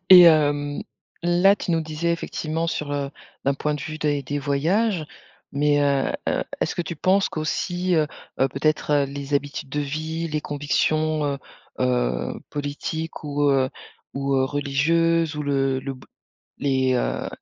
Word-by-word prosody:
Et 180 -1 +12
hem, 145 -3 +4 0.4
là, 175 +4 +5
tu 180 - -4
nous 165 - +2
disais, 160 +2 -1
effectivement, 165 -1 -2
sur, 150 -3 -2
heu, 140 -1 -2 0.3
d'un 140 - +2
point 150 +2 -1
de 145 - -5
vue, 155 -1 -5
des 145 -2 0
des 145 +2 -3
voyages, 160 +7 +1 0.5
mais 145 +1 +3
heu, 140 -1 +2 0.2
heu, - - 0 0.2
est-ce - - 0
que - - -1
tu 170 0 -6
penses 190 +5 +3
qu'aussi, 175 +3 -1
heu, 155 -2 +3 0.3
heu, 135 - +4
peut-être, 150 +3 0
heu, 145 -1 +4
les 140 +1 -4
habitudes 140 -1 -2
de 150 - -1
vie, 155 +3 -3
les 150 0 -1
convictions, 155 +2 0
heu, 140 -1 -1 0.4
heu, 60 0 +1 0.2
politiques 150 +3 -4
ou, 145 0 -1
heu, 130 -1 +2 0.4
ou, 140 0 0
heu, 130 - +3
religieuses, 155 +3 +1
ou 150 - -2
le 135 -2 +1
le 135 +1 -5
b 130 - -15 0.6
les, 130 -2 +2
heu, - - -1
145 Hz, 165 wpm, -24 LUFS, 140-160 Hz, 0.6 s, Et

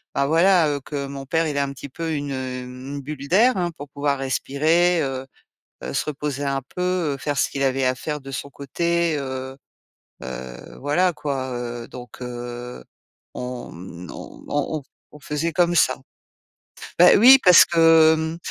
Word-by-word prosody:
bah, 140 0 +1
voilà, 165 +1 +4
heu, 145 -1 -1
que 140 0 -5
mon 135 0 -7
père, 160 +4 0
il 145 -2 -3
ait - - +2
un 140 -1 -1
petit 140 +1 -9
peu 165 +3 -4
une, 145 -1 -3
hem, 125 -1 -5 0.2
une - - -5
bulle 140 0 -7
d'air, 230 +8 +4
hein, 175 -2 -1
pour 145 0 -9
pouvoir 140 -1 -1
respirer, 160 +6 +1
heu, 135 -1 -4 0.6
heu, - - -5
se - - -1
reposer 145 -1 -4
un 135 -1 -1
peu, 180 - -3 0.3
heu, - - -9
faire 145 +3 -3
ce - - +2
qu'il 140 0 -3
avait 135 0 +1
à 130 - +1
faire 150 +2 -5
de 135 0 -9
son 140 +2 -5
côté, 170 +3 -1
heu, 130 -1 -5 0.7
heu. 65 -1 -8
Voilà 175 +6 +2
quoi, 140 -3 -3
heu. 120 -1 -5
Donc 125 0 -11
heu, 120 0 -7 0.5
on, 125 0 -6
mmh, 90 0 -10
on - - -11
on 145 +2 -1
on - - -17
f - - -32 0.3
on 150 - -14
faisait 160 +2 -2
comme 175 +1 +2
ça. 130 -5 +3 1.0
Bah 180 - +8
oui, 255 +6 +9
parce 180 -1 +8
que, 165 -2 +5
mmh, 160 +1 -3
140 Hz, 190 wpm, -22 LUFS, 130-160 Hz, 1.0 s, oui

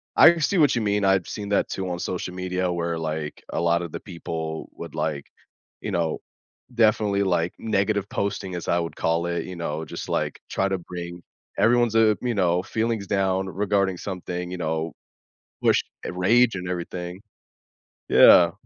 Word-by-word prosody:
I 170 +1 +8
see 170 +4 +1
what 145 -4 +5
you 120 - 0
mean, 105 -1 +1
I've 95 -2 +3
seen 100 -1 -5
that 100 - +1
too 95 -1 -3
on 90 -1 -3
social 90 0 -4
media 90 0 -1
where, 85 -1 -2
like, 80 -1 -4
a - - -1
lotta 85 0 +1
the - - -6
people 80 -3 -5
would, - - -9
like, 75 -3 -2 0.6
you - - -4
know, 85 -4 -1 0.5
definitely, 105 -3 +3
like, 90 -2 +1
"negative 100 -1 0
posting" 100 -1 -2
as 85 - -5
I 85 - +2
would 85 -1 -4
call 85 +1 0
it, 85 0 -2
you 90 - -7
know, 80 -2 -3
just, - - -7
like, - - -1
try 95 - 0
to 95 - 0
bring 85 0 -8 0.3
everyone's, 120 -1 +3
uh, 110 -1 +5
you 125 -1 0
know, 90 -2 +2
feelings 110 -1 -1
down 95 -1 +1
regarding 100 -1 0
something, 90 -1 -5
you 90 - -4
know, 80 -1 -2 0.7
push, - - +3 0.2
uh, - - -3
rage 115 +6 +4
and 90 -1 -5
everything. 90 +1 -5 0.9
Yeah. 85 -1 +8
90 Hz, 175 wpm, -24 LUFS, 85-100 Hz, 0.9 s, I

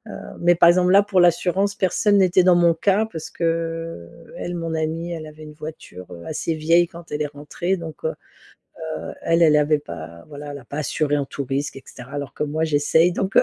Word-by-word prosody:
heu - - -7 0.2
mais 175 0 +4
par 170 0 +6
exemple 180 +1 +4
là, 200 +1 +7
pour 200 -2 +1
l'assurance, 185 +3 +2
personne 205 +2 +2
n'était 185 -1 +4
dans 180 -1 +5
mon 170 -1 +4
cas 200 +6 +1
parce 160 -1 -6
qu'elle, 165 - -4
mon 165 -1 -3
amie, 160 +2 -2
elle 160 -2 -6
avait 155 0 -12
une 150 - -10
voiture, 150 - -9
heu, 85 -1 -9
assez 160 +1 -2
vieille 165 +2 +3
quand 170 0 -13
elle 150 0 -2
est - - -2
rentrée 150 +6 -3
donc 160 -3 -9
heu 160 - 0 0.9
heu, - - -6
elle, 165 +1 +2
elle 155 -2 +6
avait 150 0 +3
pas, 85 - -9
voilà, 145 0 -9
elle 145 - -6
l'a 135 - -11
pas 140 +4 -7
assurée 150 -1 0
en 140 - -1
tous 140 - -5
risques, 135 +2 -3
et 135 - -9
cetera, 125 +2 -12
alors 140 -3 -5
que - - -3
moi, 155 +2 -1
j'essaie 160 +3 +3
donc 190 +2 -3
heu, - - +8
160 Hz, 225 wpm, -22 LUFS, 145-175 Hz, 0.9 s, heu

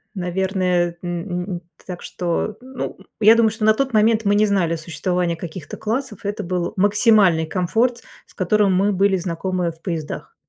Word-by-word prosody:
наверное. 180 -1 0
Н 175 +1 -3
н 175 - -5 0.3
так 180 -1 -6
что, 180 +4 -3
ну, 260 0 -6
м, - - -17 0.2
я 220 +2 +8
думаю, 230 -1 +4
что 220 0 -2
на 215 - +6
тот 265 +3 -1
момент 220 0 +3
мы 200 0 +3
не 210 +1 +4
знали 190 -5 +1
о - - -2
существовании 170 +2 -2
каких-то 165 -1 -8
классов, 225 -1 -3
это 205 +1 -3
был 175 0 -2
максимальный 205 -4 +4
комфорт, 225 +8 0 0.2
с - - -22
которым 200 +1 +2
мы 200 +3 +2
были 195 0 +2
знакомы 180 0 -2
в 165 0 -20
поездах. 165 -5 -5
190 Hz, 175 wpm, -21 LUFS, 175-215 Hz, 0.3 s, я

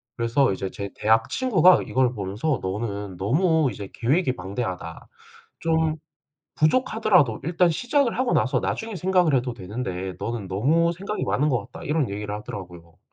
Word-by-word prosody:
그래서 115 0 +2
이제 95 0 -4
제 100 0 -6
대학 110 +1 +2
친구가 185 -9 +4
이걸 130 -1 +2
보면서 105 +6 -2
"너는 100 -1 -4
너무 155 - +2
이제 100 -1 -8
계획이 130 +2 +1
방대하다. 95 -3 -5 0.5
좀 160 -1 +1 0.6
부족하더라도 180 - +3
일단 175 +2 +3
시작을 245 - 0
하고 255 -1 +1
나서 - - +2
나중에 225 -1 -3
생각을 180 -3 +2
해도 125 -1 +1
되는데 95 -3 -5
너는 115 -4 -4
너무 155 - +2
생각이 200 +5 -4
많은 150 +3 +1
것 125 -5 -1
같다." - - -10
이런 150 -4 0
얘기를 105 +1 -4
하더라고요. 90 -5 -9
125 Hz, 355 characters per minute, -24 LUFS, 100-165 Hz, 0.6 s, 친구가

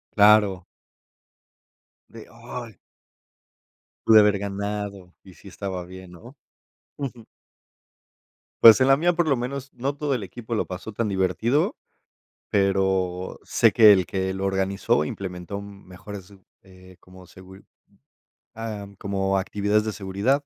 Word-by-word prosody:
Claro. 105 -3 +5 1.4
De: 115 -1 -12
"Ay". 115 -3 -9 1.3
"Pude 110 -1 +8
haber 105 -1 +4
ganado 100 -2 -5
y 95 - -15
sí 100 - -17
estaba 95 -2 -6
bien", 95 0 -12
¿no? 115 +10 -14 0.6
Ujú. 125 -5 -6 1.4
Pues, 115 +2 +10
en 130 - +4
la 135 0 +5
mía, 175 +4 +2
por 175 0 +1
lo 135 - +2
menos, 135 +3 -5
no 140 +3 -3
todo 145 -1 -2
el 125 - -2
equipo 110 +5 -7
lo 110 - 0
pasó 95 +4 -7
tan 110 +1 -2
divertido, 100 - 0 0.7
pero 95 -2 0
sé - - +2
que 110 -2 +7
el 95 -2 +1
que 95 +1 -3
lo 95 0 -4
organizó 95 -5 0
implementó 95 +3 -6
mejores, 100 0 -11 0.3
eh, 95 -1 -17
como 90 0 -16
seguri 95 +2 -15 0.9
Am, 105 -3 -7
como 95 0 -1
actividades 105 +2 0
de 110 - -3
seguridad 105 +9 -1
100 Hz, 130 wpm, -24 LUFS, 95-115 Hz, 1.4 s, Pues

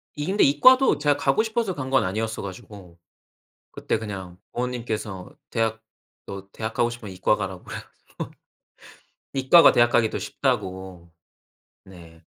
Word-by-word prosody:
이 150 - -4
근데 195 +3 +3
이과도 255 - +5
제가 145 -1 +2
가고 140 +7 +2
싶어서 220 -4 -1
간 130 -2 -5
건 135 - +3
아니었어 110 +4 -3
가지고. 95 -2 -10 0.7
그때 - - -2
그냥 95 -5 -7
부모님께서 115 -6 -4 0.2
대학 110 -1 -1 0.4
너 100 0 -8
대학 110 0 -4
가고 120 - +2
싶으면 115 -5 -8
이과 95 +3 +2
가라고 95 -3 -5
그래 - - -7 0.2
가지고. - - -8 1.0
이과가 135 +6 +7
대학가기 120 -2 +3
더 - - -4
쉽다고. 95 -2 -3 0.7
네. 85 -3 -15
110 Hz, 305 characters per minute, -24 LUFS, 95-135 Hz, 1.0 s, 이과가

